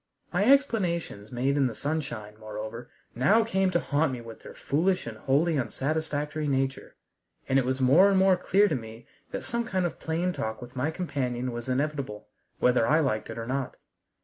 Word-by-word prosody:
My 190 +4 +2
explanations 180 - +1
made 130 +3 0
in 135 -2 +3
the 120 - -5
sunshine, 140 -9 -3
moreover, 110 +3 -7 0.2
now 200 - +4
came 190 -4 +1
to 175 -2 +2
haunt 150 -1 +1
me 125 - -4
with 115 -1 -11
their - - -11
foolish 180 +7 0
and 115 -2 -6
wholly 145 +7 +1
unsatisfactory 150 +3 -2
nature, 135 -1 -1 0.5
and 135 +1 +3
it 130 - 0
was 130 +1 -1
more 145 +10 +6
and 195 - +3
more 190 0 +5
clear 195 +3 +3
to - - -1
me 115 -1 -8 0.2
that - - -5
some 235 0 -1
kind 190 -6 -1
of 175 - -4
plain 170 +3 -1
talk 110 -6 -4
with 125 +1 -11
my 130 +4 0
companion 130 -7 -2
was 120 +1 -6
inevitable, 135 -5 -2 0.3
whether 125 -2 +3
I 155 +2 +4
liked 130 -8 -1
it - - -6
or 115 - -4
not. 130 +1 -3
140 Hz, 190 wpm, -27 LUFS, 120-170 Hz, 0.5 s, more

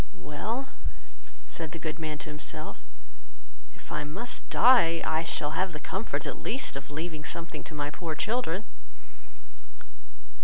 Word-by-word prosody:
"Well 220 - -2 0.8
(said 160 -2 -3
the - - -3
good 155 -1 -3
man 155 -1 -2
to - - -5
himself) 155 +1 -4 0.9
if - - -13
I 150 - 0
must 190 +12 -2
die, 220 -10 +7
I 160 +1 +3
shall 150 -2 +1
have 185 +3 +1
the 150 - -4
comfort, 190 +8 -1
at - - -3
least, 255 - +1
of 140 0 -5
leaving 155 +1 -3
something 165 +2 -2
to 155 - -6
my 145 0 -1
poor 160 -1 -3
children." 215 -1 +1
160 Hz, 145 wpm, -30 LUFS, 150-190 Hz, 0.9 s, die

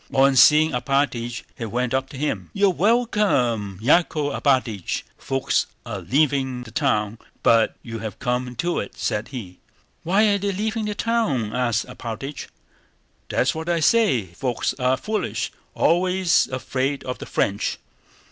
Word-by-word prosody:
On 135 0 +5
seeing 155 +4 +6
Alpátych 125 -2 -1
he 115 - -5
went 125 +3 -1
up 135 0 0
to 135 - -9
him. 150 +3 -2
"You're 200 -1 +3
welcome, 180 - +1
Yákov 150 0 +2
Alpátych. 130 - 0
Folks 135 0 -1 0.2
are 110 -5 -5
leaving 130 - +1
the 115 - -12
town, 105 0 0 0.2
but 115 -1 +4
you 115 -1 -6
have 110 -1 -6
come 125 0 -2
to 175 +7 -1
it," 100 - -6
said 105 +1 -2
he. 105 -10 -8 0.4
"Why 195 +6 +2
are 200 0 +2
they 200 0 -1
leaving 215 +3 -2
the 210 -1 -3
town?" 200 - 0
asked 120 -2 0
Alpátych. 125 +5 -6 0.8
"That's - - +1
what 160 +2 -5
I 170 -1 +2
say. 160 - +3
Folks 125 +5 -1
are 130 +1 +2
foolish! 215 +9 -2 0.2
Always 180 +1 +3
afraid 130 +2 -2
of 125 0 -5
the - - -8
French." 100 +1 0
135 Hz, 145 wpm, -23 LUFS, 120-175 Hz, 0.8 s, seeing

